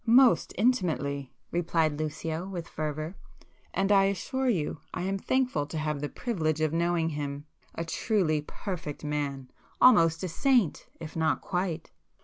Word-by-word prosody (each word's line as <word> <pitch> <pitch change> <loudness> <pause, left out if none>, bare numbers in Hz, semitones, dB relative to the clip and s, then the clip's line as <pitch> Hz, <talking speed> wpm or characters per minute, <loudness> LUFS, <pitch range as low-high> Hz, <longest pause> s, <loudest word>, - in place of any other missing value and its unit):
"Most 245 +2 +5
intimately!" 160 - +1 0.2
replied 165 -3 +1
Lucio 160 +3 -3
with 175 -3 -5
fervour—"and 155 +5 -4
I 195 -1 +6
assure 255 +7 0
you 160 -8 0 0.2
I 180 - -2
am 195 +1 -1
thankful 250 - +1
to 160 - -5
have 150 -2 -1
the 145 - -2
privilege 160 -10 -1
of 155 -1 +1
knowing 170 -1 +1
him. 145 -1 -4 0.3
A 165 - -3
truly 165 -4 +1
perfect 160 -1 -6
man!—almost 150 - +2
a - - 0
saint—if 180 - 0
not 160 -1 +1
quite!" 175 -3 -2
165 Hz, 130 wpm, -29 LUFS, 150-195 Hz, 0.3 s, I